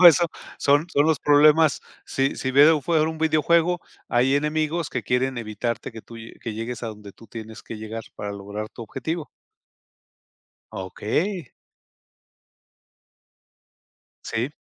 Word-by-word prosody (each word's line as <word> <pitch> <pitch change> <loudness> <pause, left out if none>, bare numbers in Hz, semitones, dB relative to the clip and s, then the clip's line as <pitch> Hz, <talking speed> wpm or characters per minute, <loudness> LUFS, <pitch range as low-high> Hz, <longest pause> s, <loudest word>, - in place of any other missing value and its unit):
todo 180 - +12
eso 170 +1 +5 0.3
son 145 +3 +3
son 145 +2 +4
los 160 -2 +2
problemas. 150 +1 +5 0.2
Sí 135 +1 0
si 130 - -2
veo 145 +4 +7
un 150 - -4
fue 160 +3 +2
un 160 0 -4
videojuego, 160 +2 +3 0.3
hay 125 +3 +3
enemigos 155 +2 0
que - - -2
quieren 130 +1 0
evitarte, 115 +2 -3
que 110 -1 -9
tú 115 - -12 0.3
que 115 - -4
llegues 115 +2 -5
a 115 - -2
donde 105 -2 -10
tú, 115 - -16
tienes 110 0 -9
que 115 - -7
llegar 110 +1 -6
para 105 0 -4
lograr 100 +2 -6
tu 115 - -10
objetivo. 155 +8 -4 1.4
Okey. 140 - -2 2.7
Sí. 120 +5 -2
135 Hz, 140 wpm, -24 LUFS, 115-155 Hz, 2.7 s, todo